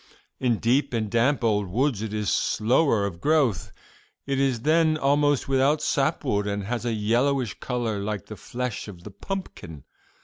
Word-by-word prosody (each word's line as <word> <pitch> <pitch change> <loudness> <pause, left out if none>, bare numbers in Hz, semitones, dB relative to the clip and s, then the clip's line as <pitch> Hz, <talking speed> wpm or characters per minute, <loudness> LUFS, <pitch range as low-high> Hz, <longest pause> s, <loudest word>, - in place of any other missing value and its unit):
In 120 -3 +1
deep 125 +5 +1
and 110 -3 -2
damp 125 +3 +2
old 105 -3 +1
woods 120 +3 0
it 110 -2 -4
is 105 -2 -1
slower 115 -1 +2
of 90 -3 -6
growth; 140 - +1 0.5
it 135 -1 -1
is 130 -4 +1
then 155 +2 +3
almost 145 -1 +2
without 135 +3 +2
sap 135 -1 0
wood 105 0 0
and 100 0 -2
has 120 +3 -3
a 120 - 0
yellowish 120 +3 0
color 120 -5 -2
like 100 -1 -4
the 110 - -9
flesh 125 +2 -5
of 90 -4 -11
the 105 - -9
pumpkin. 95 - -7
120 Hz, 170 wpm, -25 LUFS, 105-140 Hz, 0.5 s, then